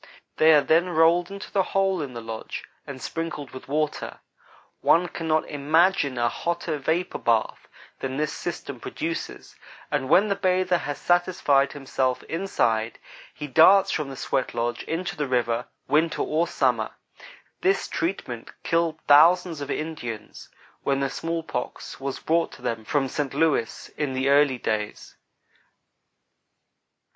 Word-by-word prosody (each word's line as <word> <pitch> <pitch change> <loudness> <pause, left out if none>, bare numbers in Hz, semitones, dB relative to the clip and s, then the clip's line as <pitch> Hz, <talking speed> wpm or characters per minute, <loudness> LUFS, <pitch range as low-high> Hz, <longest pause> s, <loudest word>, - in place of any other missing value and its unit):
They 160 +1 +6
are 150 - +6
then 170 +3 +3
rolled 170 +1 +3
into 200 0 -8
the 195 - +3 0.2
hole 195 -3 +2
in 135 -4 -6
the 115 - -5
lodge 115 -1 -6 0.2
and - - -7
sprinkled 165 -2 -5
with 130 - -10
water. 150 +2 -2 0.6
One 175 +2 +4
cannot 160 -2 -1
imagine 150 -1 +2
a 120 0 +2
hotter 170 +3 -2
vapor 165 +6 -1
bath 115 -2 0 0.3
than 135 0 -3
this 150 0 -1
system 140 -6 -5
produces, 165 +7 -5 0.4
and 135 -3 -1
when 200 +4 +5
the 200 - +1
bather 185 -2 +1
has 145 0 -4
satisfied 175 -6 +2
himself 130 -2 -1
inside, 115 - -1 0.3
he 150 - -7
darts 185 +8 +6
from 150 -3 -2
the 135 - -8
sweat 130 -3 -2
lodge 120 0 -1
into 170 +2 -3
the 150 -1 -2
river, 120 -1 0 0.2
winter 160 +2 +2
or 160 +3 0
summer. 125 -8 0 0.7
This 195 +1 +2
treatment 145 -9 -3
killed 165 -1 0
thousands 165 +2 +5
of 140 - -5
Indians 120 -9 -5 0.3
when 135 -1 0
the 135 -1 -1
smallpox 165 -6 -4
was 135 0 -3
brought 165 +1 0
to 125 - -14
them 115 -3 -3
from 140 +1 +1
Saint 140 0 -3
Louis, 150 -8 0
in 145 -3 -1
the 130 +1 +1
early 140 -2 +4
days. 110 -3 -3
150 Hz, 145 wpm, -25 LUFS, 130-170 Hz, 0.7 s, They